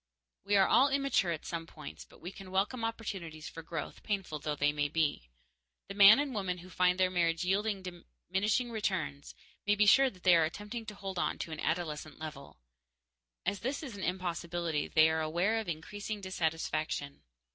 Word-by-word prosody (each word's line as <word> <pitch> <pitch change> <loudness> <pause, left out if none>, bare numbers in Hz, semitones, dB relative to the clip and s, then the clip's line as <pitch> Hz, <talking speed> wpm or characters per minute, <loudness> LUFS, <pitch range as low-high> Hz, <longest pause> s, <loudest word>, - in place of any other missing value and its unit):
_ - - -58 0.4
We 205 - +3
are 195 -1 +6
all 275 +3 +5
immature 275 -10 +2
at 160 - -4
some 165 -1 -4
points, 75 - -10
but - - -19
we 175 - -6
can 195 -1 -11
welcome 200 +6 0
opportunities 190 -9 -4
for 165 - -8
growth, 165 +1 -6
painful 195 -7 -3
though 150 0 -2
they 145 0 +2
may 145 -1 -1
be. 145 - 0 0.6
The - - -4
man 200 +2 +9
and 290 -2 -1
woman 190 -4 -2
who 180 +1 -12
find 180 0 +2
their 185 0 +3
marriage 170 -1 +1
yielding 200 +1 0
diminishing 190 +6 -2
returns 175 -10 -2 0.3
may 205 - +4
be 210 0 +4
sure 270 +6 +7
they 185 -4 +3
are 165 - +5
attempting 210 +7 -6
to 210 - -6
hold 195 -2 -5
it - - -1
to 165 - -5
an 155 - -5
adolescent 155 -2 -2
level. 150 -3 -8 0.9
As 200 +2 0
this 275 +6 -3
is 260 -8 -6
an 200 - -7
impossibility, 170 -3 -2
they 155 0 +5
are 160 0 +1
aware 175 +8 +1
of 220 - -5
increasing 205 +6 -5
dissatisfaction. 160 -5 -2
180 Hz, 190 wpm, -32 LUFS, 160-205 Hz, 0.9 s, man